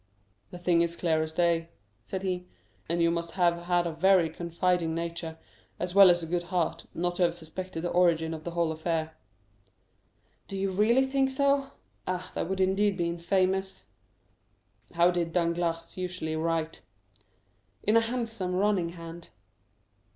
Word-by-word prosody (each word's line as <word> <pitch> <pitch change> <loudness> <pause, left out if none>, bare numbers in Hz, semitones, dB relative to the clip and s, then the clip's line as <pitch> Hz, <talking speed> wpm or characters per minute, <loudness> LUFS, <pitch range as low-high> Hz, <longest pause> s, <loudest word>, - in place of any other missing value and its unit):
"The - - -9
thing 175 -1 +2
is 170 0 0
clear 160 -2 +1
as 160 0 -3
day," 170 0 +1 0.4
said 190 0 -4
he; 180 -1 -2 0.4
"and 170 0 +1
you 170 - +4
must 170 0 -3
have 175 -2 +1
had 175 -1 +2
a 170 - -1
very 175 0 +3
confiding 170 0 0
nature, 170 -1 -4 0.4
as 180 0 -3
well 195 -1 +9
as 175 -1 +3
a - - -2
good 175 +2 -1
heart, 170 -2 -1
not 175 +1 -1
to - - -2
have 170 -1 +3
suspected 175 +1 -6
the 175 - -1
origin 165 -2 +3
of 155 -1 -7
the 170 - -4
whole 170 -1 0
affair." 160 0 -2 1.3
"Do 195 - -5
you 195 0 -1
really 225 +7 +3
think 270 0 +1
so? 275 0 +1 0.3
Ah, 185 0 -3
that - - -3
would 190 0 -2
indeed 195 +1 +2
be 170 -2 0
infamous." 185 +2 0 1.1
"How 170 +1 +5
did 170 -2 -2
Danglars 170 -1 -1
usually 180 -3 -3
write?" 165 0 -1 1.0
"In 215 - +2
a 230 - +7
handsome, 225 -6 -3
running 185 -3 +1
hand." 165 0 -10
175 Hz, 160 wpm, -28 LUFS, 165-185 Hz, 1.3 s, well